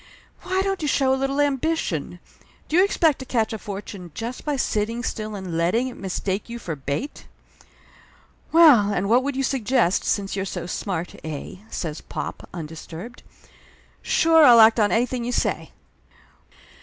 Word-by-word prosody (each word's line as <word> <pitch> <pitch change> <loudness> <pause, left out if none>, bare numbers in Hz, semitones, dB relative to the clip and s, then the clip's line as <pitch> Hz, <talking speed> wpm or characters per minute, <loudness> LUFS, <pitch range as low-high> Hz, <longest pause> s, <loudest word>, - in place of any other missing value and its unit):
Why 375 +1 0
don't 390 -2 -2
you 300 - -1
show 270 -2 +2
a - - +3
little 270 +1 -1
ambition? 290 +3 -1 0.5
Do 310 - -2
you 365 - +6
expect 325 -7 +2
to 260 - -7
catch 230 -4 0
a 220 - -4
fortune 195 -3 -8
just 235 +3 -5
by 295 -1 -1
sitting 230 -1 -1
still 215 -2 -4
and 185 -4 -5
letting 185 +10 +1
it 250 - -10
mistake 195 +2 -3
you 235 - -5
for 170 -9 -5
bait?" 145 - -5 1.2
"Well, 290 -12 +7
and 200 0 -1
what 240 +3 +5
would 280 +1 -3
you 270 - -1
suggest, 250 -7 +1
since 200 -2 -1
you're 195 - -2
so 180 -3 -5
smart, 180 -1 -4
eh?" 155 +3 -6
says 155 -3 -5
pop, - - -7
undisturbed. 165 +6 -8 0.8
"Sure, 325 -1 +4
I'll 240 -5 +8
act 220 +1 +7
on 205 -1 +3
anything 245 +1 0
you 245 - -2
say - - -1
230 Hz, 165 wpm, -23 LUFS, 190-270 Hz, 1.2 s, I'll